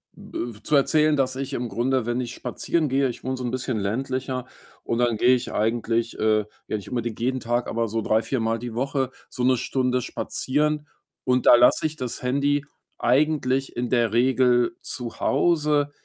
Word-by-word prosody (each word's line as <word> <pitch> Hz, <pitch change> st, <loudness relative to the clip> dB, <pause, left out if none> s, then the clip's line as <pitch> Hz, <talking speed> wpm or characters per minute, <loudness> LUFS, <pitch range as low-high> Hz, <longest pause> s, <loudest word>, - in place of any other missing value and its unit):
äh, 115 Hz, -3 st, -6 dB
zu 150 Hz, -, +1 dB
erzählen, 150 Hz, +2 st, +4 dB
dass 130 Hz, -2 st, 0 dB
ich 135 Hz, +1 st, -4 dB
im 125 Hz, -2 st, -2 dB
Grunde, 120 Hz, +3 st, 0 dB
wenn 120 Hz, +1 st, -1 dB
ich 120 Hz, -1 st, -5 dB
spazieren 160 Hz, -4 st, -1 dB
gehe 135 Hz, +1 st, +2 dB
ich 120 Hz, -, -8 dB
wohne 130 Hz, 0 st, -2 dB
so 125 Hz, -, -5 dB
'n 120 Hz, -, -1 dB
bisschen 125 Hz, -2 st, -2 dB
ländlicher 130 Hz, +4 st, -2 dB, 0.4 s
und 115 Hz, -, -1 dB
dann 120 Hz, -2 st, +2 dB
gehe 125 Hz, +4 st, +5 dB
ich 125 Hz, -1 st, -1 dB
eigentlich, 115 Hz, +1 st, 0 dB
äh 110 Hz, -1 st, +2 dB, 0.2 s
ja, -, -, -2 dB
nicht 100 Hz, -, -9 dB
unbedingt 120 Hz, -3 st, -3 dB
jeden 130 Hz, +2 st, 0 dB
Tag, 120 Hz, +1 st, -1 dB
aber 115 Hz, 0 st, -1 dB
so 110 Hz, +1 st, -2 dB
3, 110 Hz, +1 st, +2 dB
4, 130 Hz, +2 st, -2 dB
mal 115 Hz, 0 st, 0 dB
die 120 Hz, -1 st, -6 dB
Woche 135 Hz, 0 st, -1 dB, 0.2 s
so 125 Hz, -, -4 dB
1 130 Hz, 0 st, +4 dB
Stunde 125 Hz, +1 st, 0 dB
spazieren. 150 Hz, +5 st, -1 dB, 0.4 s
Und 125 Hz, -1 st, +1 dB
da -, -, +10 dB
lasse 125 Hz, +5 st, +5 dB
ich 155 Hz, -, -8 dB
das 125 Hz, -5 st, -4 dB
Handy 140 Hz, +3 st, +1 dB, 0.4 s
eigentlich 135 Hz, 0 st, +1 dB
in 120 Hz, 0 st, -2 dB
der 115 Hz, -3 st, +2 dB
Regel 125 Hz, +3 st, +3 dB
zu 120 Hz, -4 st, -6 dB
Hause. 150 Hz, -1 st, +2 dB
125 Hz, 190 wpm, -24 LUFS, 120-135 Hz, 0.4 s, da